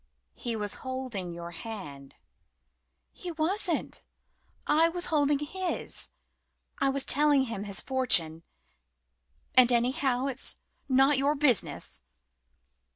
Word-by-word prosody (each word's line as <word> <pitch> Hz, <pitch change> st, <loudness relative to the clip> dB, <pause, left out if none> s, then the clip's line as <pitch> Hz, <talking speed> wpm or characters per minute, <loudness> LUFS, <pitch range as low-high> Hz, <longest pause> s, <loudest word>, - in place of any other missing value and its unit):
"He 235 Hz, -2 st, -3 dB
was 210 Hz, -2 st, -2 dB
holding 255 Hz, -9 st, -5 dB
your 170 Hz, 0 st, -8 dB
hand." 165 Hz, -8 st, -9 dB, 1.0 s
"He 360 Hz, -, -7 dB
wasn't 340 Hz, +2 st, -1 dB, 0.6 s
I 320 Hz, +2 st, +4 dB
was 350 Hz, +1 st, -1 dB
holding 290 Hz, -1 st, +3 dB
his. 350 Hz, +5 st, -2 dB, 0.7 s
I 275 Hz, -, +2 dB
was 270 Hz, 0 st, +2 dB
telling 290 Hz, -1 st, +4 dB
him 225 Hz, -5 st, -5 dB
his 200 Hz, -1 st, -1 dB
fortune. 175 Hz, -12 st, +2 dB, 1.1 s
And, 255 Hz, -1 st, +6 dB
anyhow, 250 Hz, +2 st, +1 dB
it's 270 Hz, -1 st, -1 dB, 0.3 s
not 270 Hz, +1 st, +4 dB
your 285 Hz, +2 st, +2 dB
business." 260 Hz, -, +1 dB
260 Hz, 105 wpm, -28 LUFS, 215-295 Hz, 1.1 s, And